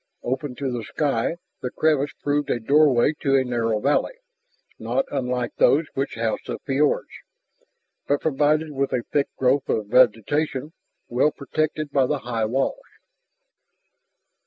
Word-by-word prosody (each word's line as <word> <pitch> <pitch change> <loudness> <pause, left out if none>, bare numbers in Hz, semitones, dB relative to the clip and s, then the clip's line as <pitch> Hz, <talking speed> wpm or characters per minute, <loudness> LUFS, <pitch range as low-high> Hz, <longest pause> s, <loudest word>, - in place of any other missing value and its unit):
Open 130 +1 -3
to 135 -1 -3
the 120 -2 -3
sky 140 +3 -1 0.3
the 125 - -2
crevice 145 0 +1
proved 145 0 0
a 120 - 0
doorway 140 +2 +4
to 135 -2 +2
a 135 - +4
narrow 115 -3 0
valley, 145 - +1 0.6
not 270 - -1
unlike 125 -3 -2
those 155 +4 +4
which 135 +1 -2
housed 115 -1 -2
the - - -3
fiords, 140 +2 +1 1.0
but 145 0 +2
provided 155 +1 +1
with 140 -1 -1
a 120 - 0
thick 145 -1 +2
growth 130 +1 +1
of 110 - 0
vegetation 130 +5 +2 0.3
well 125 +5 +2
protected 155 +1 -3
by 135 -2 +3
the 150 - 0
high 115 -4 -2
walls. 135 - -1
135 Hz, 140 wpm, -23 LUFS, 125-145 Hz, 1.0 s, doorway